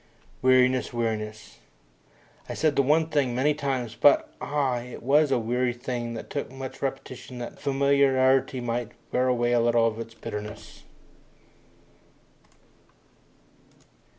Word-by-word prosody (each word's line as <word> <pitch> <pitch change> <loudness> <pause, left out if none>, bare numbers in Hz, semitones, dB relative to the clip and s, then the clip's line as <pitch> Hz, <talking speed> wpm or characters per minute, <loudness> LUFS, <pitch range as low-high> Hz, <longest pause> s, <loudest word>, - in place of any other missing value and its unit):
Weariness! 130 0 +3
Weariness! 110 -2 -4 0.9
I - - -4
said 155 -3 +1
the - - +4
one 155 +4 +2
thing 140 -6 0
many 145 +4 +2
times 135 -6 -3
but, 140 +4 +4
ah, 140 -4 0
it 125 0 -9
was 145 +4 +4
a 135 - +2
weary 120 +2 0
thing 120 -1 -4
which - - -8
took 140 - -4
much 135 0 -8
repetition 130 -2 -5
that 120 -1 -7
familiarity 135 -1 +2
might 120 -1 -3 0.2
wear 125 +1 +1
away 120 -1 +1
a 120 - +3
little 115 0 +3
of 115 0 -1
its 115 0 -8
bitterness! 105 -1 -8
125 Hz, 125 wpm, -26 LUFS, 120-135 Hz, 0.9 s, the